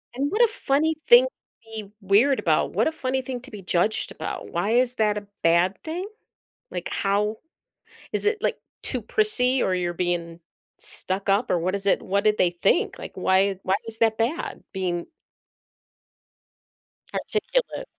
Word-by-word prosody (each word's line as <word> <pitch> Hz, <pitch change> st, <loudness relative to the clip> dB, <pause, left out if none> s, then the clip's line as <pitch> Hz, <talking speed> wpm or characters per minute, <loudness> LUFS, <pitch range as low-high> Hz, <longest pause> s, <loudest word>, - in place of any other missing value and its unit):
And, 270 Hz, -, -2 dB
and 285 Hz, -, 0 dB
what 430 Hz, +4 st, +1 dB
a -, -, +6 dB
funny 315 Hz, -5 st, 0 dB
thing 485 Hz, +1 st, +8 dB
to -, -, -5 dB, 0.5 s
be 205 Hz, -2 st, -7 dB
weird 215 Hz, +8 st, +4 dB
about, -, -, +1 dB
what -, -, +2 dB
a -, -, +1 dB
funny 265 Hz, -4 st, -2 dB
thing 250 Hz, -1 st, -5 dB
to 270 Hz, -, -13 dB
be 205 Hz, -2 st, -8 dB
judged 180 Hz, +4 st, 0 dB
about, -, -, -6 dB
why 210 Hz, -, -1 dB
is 250 Hz, +1 st, +2 dB
that 210 Hz, -1 st, +1 dB
a 205 Hz, -1 st, -7 dB, 0.2 s
bad 170 Hz, +3 st, +3 dB
thing? 350 Hz, +5 st, -4 dB, 0.6 s
Like, -, -, -4 dB
how 210 Hz, +2 st, 0 dB, 0.7 s
is -, -, -1 dB
it, 425 Hz, +1 st, +2 dB
like, -, -, 0 dB, 0.3 s
too -, -, +2 dB
prissy 265 Hz, -, +3 dB
or 185 Hz, -, +1 dB
you're 175 Hz, -1 st, -1 dB
being 170 Hz, -1 st, -2 dB, 0.4 s
stuck 195 Hz, +2 st, -3 dB
up, 200 Hz, +5 st, +2 dB
or 175 Hz, -, +2 dB
what 185 Hz, +3 st, -1 dB
is 200 Hz, 0 st, -4 dB
it 195 Hz, -, +3 dB
what 200 Hz, +2 st, 0 dB
did 215 Hz, 0 st, +3 dB
they 180 Hz, -, +4 dB
think? 175 Hz, +2 st, +1 dB
Like, -, -, -8 dB
why 190 Hz, +1 st, +2 dB
why 190 Hz, -, +2 dB
is 225 Hz, 0 st, -3 dB
that 225 Hz, -1 st, +3 dB
bad 240 Hz, +9 st, -2 dB
being 175 Hz, -2 st, -2 dB, 2.1 s
articulate? 475 Hz, +3 st, -2 dB
210 Hz, 175 wpm, -24 LUFS, 190-270 Hz, 2.1 s, thing